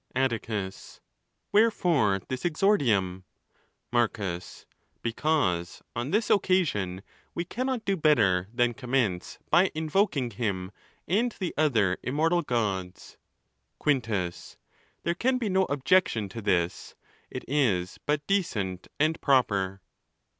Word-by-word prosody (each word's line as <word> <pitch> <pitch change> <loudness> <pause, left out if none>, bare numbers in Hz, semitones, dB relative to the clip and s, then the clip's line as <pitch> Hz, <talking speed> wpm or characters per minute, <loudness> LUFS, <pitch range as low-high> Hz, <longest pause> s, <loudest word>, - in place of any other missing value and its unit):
Atticus. 110 -6 -2 0.3
— - - -51
Wherefore 170 - +3
this 130 -1 -4
exordium? 125 - +2 0.7
Marcus.—Because 110 - -2
on 120 +3 -2
this 210 +4 +1
occasion 130 - +1 0.3
we 170 - -2
cannot 255 +4 -2
do 195 - +1
better 105 - +3
than 120 0 +1
commence 125 -8 -1
by 180 +4 +5
invoking 155 - +1
him 100 -4 -3 0.4
and 225 +8 +2
the 185 -3 -2
other 110 -12 +2
immortal 165 +6 +1
ods. 95 -6 -2 0.6
Quintus.—There 115 - -3
can 255 +8 +1
be 230 -4 -2
no 190 0 +3
objection 140 - +2
to 115 +4 -7
this: 90 -4 -1 0.3
it - - -7
is 110 -11 +1
but 150 0 0
decent 105 - -1
and 155 +2 +1
proper. 100 -8 +2
125 Hz, 105 wpm, -27 LUFS, -, 0.7 s, by